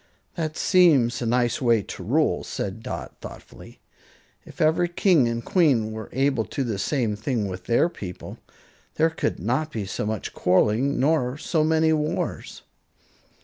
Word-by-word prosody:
"That 155 -3 -4
seems 145 -11 +4
a 120 - -1
nice 120 +1 +1
way 115 -4 +3
to - - -8
rule," - - +1
said - - -5
Dot, - - -6
thoughtfully. - - -12 0.7
"If - - -14
every 160 +3 +2
king 175 - +3
and 115 0 -3
queen 135 - +2
were 110 -1 -7
able 135 -3 +1
to 135 - -3
do - - -4
the 100 - -3
same 115 -4 0
thing 110 0 -2
with 90 -1 -7
their 120 +7 +3
people, 95 - -9 0.6
there 160 +1 +2
could 160 - -2
not 130 - -1
be 105 -3 -4
so 100 - -4
much 110 -2 -4
quarreling 110 +9 +2
nor 135 -2 +1
so 155 0 0
many 160 0 +3
wars." 150 -1 -3
125 Hz, 160 wpm, -24 LUFS, 110-155 Hz, 0.7 s, seems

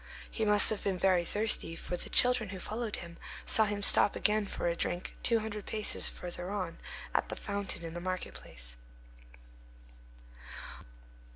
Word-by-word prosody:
He 220 - -2
must 210 0 +7
have 215 - -3
been 195 -2 -1
very 185 -1 +3
thirsty: 205 -3 +1
for 175 - -5
the - - -6
children 250 -4 +4
who 190 - -6
followed 220 +3 -4
him 170 -1 -8 0.3
saw 220 - +4
him 205 -1 -3
stop 200 - +5
again 210 -1 +2
for - - -5
a 170 - 0
drink, 175 +1 -3
two 235 - +4
hundred 210 -2 -6
paces 215 -1 +2
further 175 0 -7
on, 185 -4 -4 0.3
at - - 0
the - - -4
fountain 200 -4 -4
in 165 - -7
the 175 - -5
market 185 0 -4
place. - - -8
200 Hz, 165 wpm, -31 LUFS, 175-215 Hz, 0.3 s, must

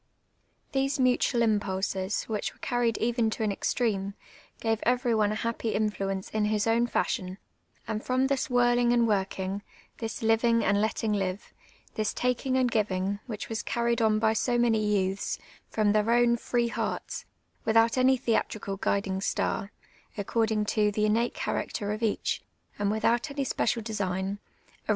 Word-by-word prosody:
These 275 0 0
mutual 250 -1 +3
impulses, 195 -2 0
w 220 - -3
Inch 210 - -3
were - - -25
carried 240 -3 0
even 235 -1 +1
to 220 - -3
an 210 - +1
extreme, 200 -2 -1 0.4
gave 225 -1 0
every 245 0 +2
one 210 -2 +2
a - - -1
happy 230 0 -2
influence 195 -2 -1
in 215 -1 +1
his 210 0 +1
own 230 +1 +3
fashion; 185 -3 -1 0.5
and 220 -1 -3
from 255 +1 +1
this 275 +2 0
whirling 240 -1 +3
and 235 -1 +3
working, 195 -1 -1 0.4
tliis 225 -1 -4
living 230 +1 +3
and 200 +1 +3
letting 220 0 0
livc, 195 0 -2 0.4
tJiis 215 -1 -1
taking 250 +1 0
and 255 -2 +2
giving, 200 -2 0
which 215 -4 -5
was 225 0 -3
carried 235 0 0
on 215 -1 +3
by 220 0 +3
so 240 +2 +1
many 230 -3 +3
youths, 195 -2 0 0.3
from 215 -2 +2
their 215 +1 +2
own 240 0 +4
free 235 0 0
hearts, - - -3 0.4
without 225 +1 +4
any 260 +1 +4
theatrical 220 -5 -1
guiding 195 -1 -1
star, 200 0 -1 0.5
according 215 +1 0
to 210 0 +2
tlic 210 +1 +1
innate 230 +3 +1
chjiracter 205 -1 -2
of 215 - -5
each, 220 -2 0 0.4
and 205 -1 +1
w 215 - -1
ithout 235 +5 +2
any 280 -1 -2
s])ecial 230 -2 0
design, 195 -2 -2 0.5
aro.' - - -24
220 Hz, 165 wpm, -28 LUFS, 205-235 Hz, 0.5 s, own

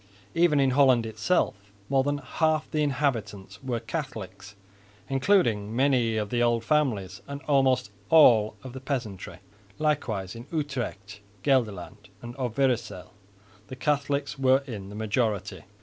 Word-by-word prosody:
Even 165 -3 +3
in 135 -1 +3
Holland 130 -3 +4
itself 110 +11 0 0.3
more 135 -1 +2
than 145 +1 0
half 155 +2 0
the 155 - 0
inhabitants 110 -9 -2
were 125 -3 -2
Catholics, 110 - -6 0.5
including 130 - +2
many 125 -4 +2
of 105 -1 -2
the 120 - +1
old 120 -1 +2
families 110 -10 0
and 140 0 -6
almost 130 -7 +2 0.2
all 115 -9 +6
the 130 0 -7
peasantry. 125 -8 -5 0.4
Likewise 115 -11 -1
in 115 +3 -10
Utrecht, 125 - -4 0.2
Gelderland 105 -5 -1
and 120 0 -8
Overyssel 120 -6 -1 0.6
the 130 - -8
Catholics 140 +1 -1
were 135 +1 +4
in 105 -7 -7
the 105 - -9
majority. 105 -2 -2
125 Hz, 130 wpm, -27 LUFS, 110-140 Hz, 0.6 s, all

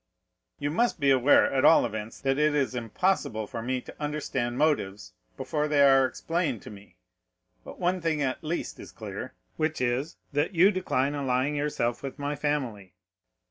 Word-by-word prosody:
"You 145 0 -2
must 235 +4 +1
be 140 -2 +3
aware, 130 +2 +5
at 130 - +2
all 165 - +6
events, 110 -1 -6
that 135 +1 +1
it 150 0 +3
is 140 -3 +1
impossible 120 - -1
for 115 +2 -6
me 125 +2 -2
to - - -11
understand 135 -5 -2
motives 105 - 0 0.2
before 150 -1 -1
they 145 -1 +4
are 135 -1 +6
explained 165 - -2
to - - -9
me; 100 0 -14 0.7
but - - -10
one 180 +1 0
thing 160 -2 0
at 135 0 -2
least 165 +3 -4
is - - -10
clear, - - -7 0.2
which 155 0 -1
is, 125 +5 -1 0.2
that 145 +6 0
you 185 +5 +6
decline 145 -8 0
allying 135 0 0
yourself 145 -5 -1
with 135 -1 -6
my 145 0 -3
family." 130 -11 -3
140 Hz, 175 wpm, -27 LUFS, 125-150 Hz, 0.7 s, all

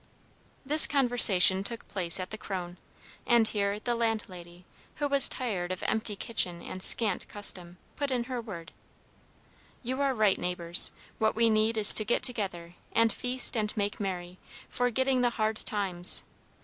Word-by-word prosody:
This 305 +3 +9
conversation 230 -9 +5
took 230 +2 -4
place 180 -3 -1
at 185 - -8
the 215 - -7
Kröne, 180 -4 -8 0.5
and 235 -2 +2
here 200 -1 -3
the 240 +2 -4
landlady, 185 -7 -6 0.3
who 290 - -3
was 280 -1 +3
tired 190 -8 -5
of 185 - -7
empty 220 -1 -3
kitchen 180 -5 -1
and 185 - -10
scant 210 -1 +2
custom, 180 -4 0 0.2
put 285 -1 -4
in 250 -2 -3
her 250 0 -7
word: 180 -8 -11 1.1
"You 260 +3 -5
are 275 -2 -1
right, 215 -4 0
neighbors. 175 -1 -1 0.3
What 220 -1 -1
we 230 0 +1
need 220 +1 -1
is 210 -1 +10
to 215 - +3
get 240 - -2
together, 190 -8 -4 0.2
and 230 0 +1
feast 250 0 -1
and 215 -1 -3
make 205 0 -4
merry, 180 -2 -7 0.3
forgetting 255 +1 -2
the 245 - +1
hard 215 -1 -2
times. 185 -4 -1
215 Hz, 160 wpm, -26 LUFS, 185-240 Hz, 1.1 s, is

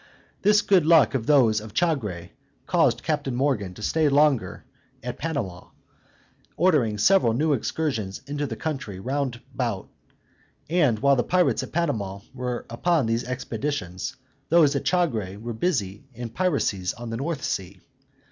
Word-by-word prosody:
This 210 +1 +4
good 190 -4 +4
luck 160 -6 +5
of 130 -3 -2
those 120 -8 +4
of 110 0 -11
Chagre 105 - -1 0.3
caused - - +2
Captain 145 -5 -1
Morgan 120 -9 0
to 105 - -9
stay 155 +5 +2
longer 140 -9 +2 0.4
at 125 0 -5
Panama, 120 - -4 0.9
ordering 150 - +3
several 120 - +4
new 150 +5 +2
excursions 115 -7 -2
into 145 +1 -3
the 115 - -5
country 130 -10 -4
round 130 +1 -2
about; 120 -7 -3 0.8
and 150 -9 +2
while 140 +4 +4
the - - +3
pirates 180 -1 +2
at - - -7
Panama 110 - -2
were 125 -2 -4
upon 155 +5 +1
these 115 +1 0
expeditions, 125 -4 -4 0.3
those 155 -4 +5
at 140 - -2
Chagre 115 - 0
were 115 +3 -5
busy 110 - -2
in 120 0 -5
piracies 115 - 0
on 120 0 -7
the 115 - -3
North 150 +3 -3
Sea. 95 0 -3
130 Hz, 145 wpm, -25 LUFS, 110-150 Hz, 0.9 s, luck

